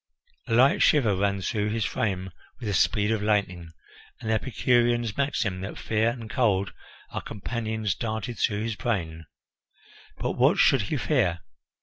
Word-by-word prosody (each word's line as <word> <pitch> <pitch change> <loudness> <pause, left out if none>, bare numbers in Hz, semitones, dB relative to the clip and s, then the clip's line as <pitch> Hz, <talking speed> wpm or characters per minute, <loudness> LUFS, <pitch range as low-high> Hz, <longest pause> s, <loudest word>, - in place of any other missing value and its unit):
A 115 - +1
light 130 +4 +5
shiver 120 -10 +4
ran 100 0 0
through 105 +2 -1
his 110 -1 -1
frame 95 -3 -2 0.3
with 120 - -6
the 105 - -1
speed 105 +3 +2
of 110 -2 0
lightning, 100 -5 0 0.5
and 110 - -3
the - - +3
Epicurean's 120 -1 +1
maxim 110 -9 -1
that 95 - -6
fear 110 +1 +1
and 115 -2 -6
cold 100 -6 +1 0.4
are - - -4
companions 110 -1 -3
darted 110 +1 -4
through 105 -1 0
his 115 -1 -2
brain. 80 - -3 0.9
But - - -2
what - - +3
should - - +5
he - - -2
fear? 85 -1 +1
110 Hz, 155 wpm, -26 LUFS, 100-115 Hz, 0.9 s, light